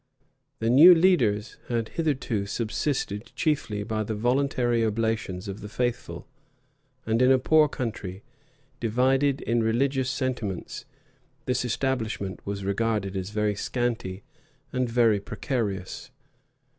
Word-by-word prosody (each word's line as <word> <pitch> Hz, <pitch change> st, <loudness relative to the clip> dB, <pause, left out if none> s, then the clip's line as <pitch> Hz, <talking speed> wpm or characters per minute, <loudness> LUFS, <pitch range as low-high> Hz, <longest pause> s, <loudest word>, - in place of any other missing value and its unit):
The 115 Hz, +1 st, 0 dB
new 165 Hz, +8 st, +9 dB
teachers 120 Hz, -, +2 dB
had 115 Hz, -2 st, -1 dB
hitherto 130 Hz, -10 st, -1 dB
subsisted 110 Hz, -1 st, -2 dB
chiefly 125 Hz, -10 st, -1 dB
by 110 Hz, 0 st, -2 dB
the 110 Hz, +1 st, -3 dB
voluntary 120 Hz, 0 st, +1 dB
oblations 110 Hz, -4 st, -1 dB
of 100 Hz, +1 st, -6 dB
the 105 Hz, -, -7 dB
faithful; 120 Hz, +2 st, -3 dB, 0.8 s
and 115 Hz, +2 st, +1 dB
in 125 Hz, +1 st, +6 dB
a 130 Hz, -, +6 dB
poor 155 Hz, +3 st, +4 dB
country, 105 Hz, -8 st, -5 dB, 0.6 s
divided 130 Hz, +4 st, +2 dB
in 115 Hz, 0 st, +1 dB
religious 130 Hz, +4 st, +1 dB
sentiments, 125 Hz, -9 st, -3 dB, 0.6 s
this 125 Hz, 0 st, 0 dB
establishment 115 Hz, -6 st, -2 dB
was 100 Hz, -1 st, -4 dB
regarded 100 Hz, -1 st, -1 dB
as 95 Hz, 0 st, -3 dB
very 105 Hz, 0 st, 0 dB
scanty 110 Hz, -3 st, -3 dB, 0.5 s
and 125 Hz, -1 st, 0 dB
very 115 Hz, -3 st, +3 dB
precarious. 100 Hz, -4 st, -4 dB
115 Hz, 120 wpm, -26 LUFS, 105-130 Hz, 0.8 s, new